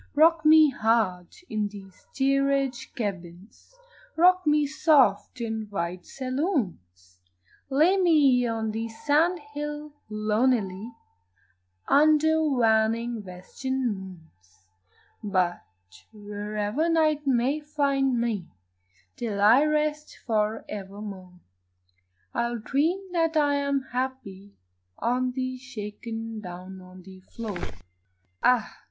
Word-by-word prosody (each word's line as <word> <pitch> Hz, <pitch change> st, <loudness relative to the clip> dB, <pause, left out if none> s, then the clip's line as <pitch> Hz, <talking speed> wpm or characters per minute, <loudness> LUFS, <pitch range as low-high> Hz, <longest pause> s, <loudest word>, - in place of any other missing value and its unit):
Rock 320 Hz, +2 st, +5 dB
me 310 Hz, -1 st, +7 dB
hard 220 Hz, -7 st, +1 dB, 0.2 s
in 210 Hz, -5 st, -2 dB, 0.2 s
steerage 275 Hz, +3 st, -1 dB
cabins, 190 Hz, -, -7 dB, 0.4 s
Rock 365 Hz, 0 st, +4 dB
me 300 Hz, 0 st, +4 dB
soft 275 Hz, -, +2 dB
in 220 Hz, -2 st, -3 dB
wide 180 Hz, -2 st, -4 dB
saloons, 200 Hz, -, -3 dB, 0.5 s
Lay 315 Hz, +8 st, +4 dB
me 290 Hz, -9 st, +4 dB
on 225 Hz, -1 st, -2 dB
the 225 Hz, +1 st, -4 dB
sand 300 Hz, +8 st, +1 dB, 0.2 s
hill 295 Hz, 0 st, -5 dB, 0.2 s
lonely 215 Hz, -1 st, 0 dB, 1.0 s
Under 310 Hz, +2 st, +4 dB
waning 230 Hz, -4 st, +1 dB
western 240 Hz, +7 st, -3 dB
moons; 160 Hz, -, -13 dB, 0.6 s
But 185 Hz, -4 st, 0 dB, 0.5 s
wherever 210 Hz, +7 st, -3 dB
night 310 Hz, -3 st, +2 dB
may 265 Hz, +3 st, +2 dB
find 280 Hz, -4 st, 0 dB
me 220 Hz, -7 st, -2 dB, 0.7 s
Till 215 Hz, -4 st, -3 dB
I 225 Hz, +7 st, +6 dB
rest 300 Hz, 0 st, -1 dB
for 215 Hz, -1 st, 0 dB
evermore 195 Hz, -2 st, -8 dB, 0.9 s
I 235 Hz, 0 st, 0 dB
will 240 Hz, -, -3 dB
dream 330 Hz, -, -1 dB
that 330 Hz, -2 st, +1 dB
I 290 Hz, -1 st, +3 dB
am 280 Hz, -1 st, 0 dB
happy 235 Hz, -6 st, -5 dB, 0.4 s
On 250 Hz, +1 st, 0 dB
the 255 Hz, 0 st, -3 dB
shake 210 Hz, -5 st, -8 dB, 0.4 s
down 185 Hz, 0 st, -9 dB
on 185 Hz, 0 st, -14 dB
the 190 Hz, 0 st, -13 dB
floor. 205 Hz, 0 st, -7 dB, 0.8 s
Ah! 245 Hz, -3 st, +2 dB
240 Hz, 100 wpm, -26 LUFS, 205-290 Hz, 1.0 s, me